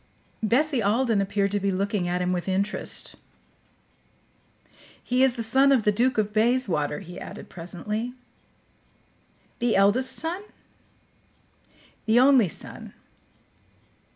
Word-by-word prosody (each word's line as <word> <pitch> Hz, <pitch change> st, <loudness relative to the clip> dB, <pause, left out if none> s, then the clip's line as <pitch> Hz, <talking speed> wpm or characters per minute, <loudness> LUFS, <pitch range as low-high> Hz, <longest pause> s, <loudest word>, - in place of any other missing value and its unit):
Bessie 255 Hz, +4 st, +1 dB
Alden 220 Hz, +1 st, +2 dB
appeared 200 Hz, 0 st, 0 dB
to 205 Hz, -, 0 dB
be 200 Hz, 0 st, 0 dB
looking 195 Hz, -1 st, -1 dB
at 180 Hz, +1 st, -1 dB
him 180 Hz, 0 st, 0 dB
with 180 Hz, +1 st, -3 dB
interest. 195 Hz, +2 st, -1 dB, 1.9 s
"He 250 Hz, +1 st, +1 dB
is 265 Hz, -2 st, +4 dB
the 230 Hz, -, -3 dB
son 265 Hz, +5 st, +3 dB
of 255 Hz, -5 st, +3 dB
the 210 Hz, -, +3 dB
Duke 245 Hz, +5 st, +1 dB
of 210 Hz, -1 st, 0 dB
Bayswater," 215 Hz, -, +1 dB
he 175 Hz, +1 st, -10 dB
added -, -, -9 dB
presently. 210 Hz, +7 st, -5 dB, 1.5 s
"The 240 Hz, -2 st, +1 dB
eldest 205 Hz, +7 st, +2 dB
son?" 335 Hz, +4 st, -4 dB, 1.7 s
"The 225 Hz, +2 st, +5 dB
only 255 Hz, -6 st, +5 dB
son." -, -, -9 dB
215 Hz, 120 wpm, -25 LUFS, 195-250 Hz, 1.9 s, The